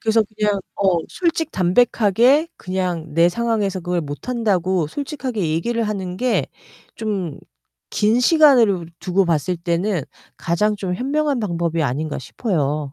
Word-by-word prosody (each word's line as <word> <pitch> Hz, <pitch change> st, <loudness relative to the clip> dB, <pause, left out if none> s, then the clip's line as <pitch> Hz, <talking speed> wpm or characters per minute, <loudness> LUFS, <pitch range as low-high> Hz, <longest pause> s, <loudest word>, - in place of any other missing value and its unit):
그래서 225 Hz, 0 st, +3 dB
그냥 210 Hz, -1 st, -1 dB, 0.2 s
어, 190 Hz, -4 st, +2 dB
솔직 330 Hz, -3 st, -1 dB
담백하게 235 Hz, -, +3 dB
그냥 180 Hz, -4 st, -3 dB
내 170 Hz, +1 st, +5 dB
상황에서 210 Hz, -2 st, -1 dB
그걸 175 Hz, 0 st, -1 dB
못한다고 185 Hz, -, -1 dB
솔직하게 260 Hz, -, -3 dB
얘기를 230 Hz, +9 st, -1 dB
하는 190 Hz, -4 st, -3 dB
게 250 Hz, +3 st, +1 dB, 0.5 s
좀 195 Hz, -9 st, -3 dB, 0.5 s
긴 220 Hz, +3 st, +2 dB
시간을 245 Hz, -, +5 dB
두고 185 Hz, +1 st, +1 dB
봤을 170 Hz, +2 st, 0 dB
때는 170 Hz, +1 st, -1 dB, 0.3 s
가장 210 Hz, +5 st, 0 dB
좀 185 Hz, -3 st, -3 dB
현명한 280 Hz, +2 st, 0 dB
방법이 170 Hz, -4 st, -1 dB
아닌가 145 Hz, +3 st, -2 dB
싶어요. 150 Hz, -, -2 dB
195 Hz, 285 characters per minute, -20 LUFS, 170-235 Hz, 0.5 s, 내